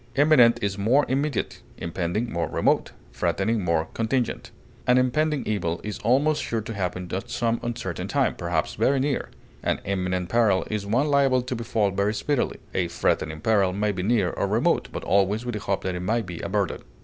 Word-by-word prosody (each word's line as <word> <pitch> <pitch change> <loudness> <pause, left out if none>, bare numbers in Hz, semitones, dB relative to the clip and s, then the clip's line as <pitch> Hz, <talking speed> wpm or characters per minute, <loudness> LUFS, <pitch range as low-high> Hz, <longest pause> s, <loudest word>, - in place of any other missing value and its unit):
Imminent 135 -5 +6
is 100 0 -1
more 125 +8 +3
immediate, 140 -1 -1 0.2
impending 90 +7 -2
more 85 -2 -1
remote, - - +1 0.2
threatening 110 -2 0
more 85 -2 +1
contingent. 115 +2 -1 0.4
An 125 0 +5
impending 145 +3 +1
evil 85 -6 -1
is 105 -2 -5
almost 145 +5 +2
sure 115 -3 -2
to 110 +1 -6
happen 90 -2 -3
at 95 +1 -3
some 115 -1 0
uncertain 120 -1 -4
time, - - +1
perhaps 85 -2 -1
very 130 +6 +2
near; 140 0 -1 0.3
an - - 0
imminent 90 -2 -1
peril 110 -3 +2
is 105 -2 -2
one 120 +7 +2
liable 135 -3 +3
to 125 0 -3
befall 115 -3 0
very 100 +3 0
speedily; 130 +5 -1 0.2
a 90 -2 0
threatening 80 -2 -1
peril 100 -4 +2
may 105 +2 0
be 95 -2 -4
near 100 -2 +2
or - - -1
remote, - - +1
but - - -5
always 100 +4 +2
with 120 - -3
hope 100 -1 -2
that 95 - -1
it 90 - -3
may 110 +6 0
be 85 -3 -7
averted. - - -1
110 Hz, 185 wpm, -25 LUFS, 95-125 Hz, 0.4 s, Imminent